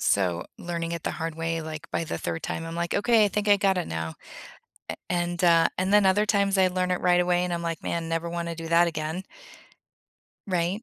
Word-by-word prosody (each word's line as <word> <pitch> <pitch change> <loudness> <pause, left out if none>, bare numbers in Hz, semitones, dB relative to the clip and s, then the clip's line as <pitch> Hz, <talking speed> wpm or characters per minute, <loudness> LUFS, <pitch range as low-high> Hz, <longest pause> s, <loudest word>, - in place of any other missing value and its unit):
so 90 -4 +1
learning 170 -1 -4
it 170 -2 -4
the - - -1
hard 165 -1 -4
way, 165 0 -2
like, 155 -1 -7
by - - -1
the 85 - -4
3rd 85 -1 -4
time, 165 - -4
I'm 165 0 -6
like, 170 0 -2
"Okay, 225 0 +4
I - - +3
think 210 +1 -2
I 205 - +7
got 195 -1 +2
it 175 - -3
now." 80 0 -4 0.8
A - - -5
and 175 0 -1
uh, 165 -1 +5
and 185 +2 0
then 210 -1 +6
other 205 +3 +3
times, 200 -2 +2
I 190 - +5
learn 180 0 -1
it 180 - 0
right 180 -1 +4
away, 180 0 +2
and 180 - -3
I'm 170 - -3
like, 165 -1 -3
"Man, 165 -1 -2
never 165 +1 -2
wanna 170 0 -3
do 165 0 -6
that 170 +1 +4
again." 160 +3 -4 1.2
Right? 180 +3 -1
170 Hz, 235 wpm, -26 LUFS, 165-185 Hz, 1.2 s, I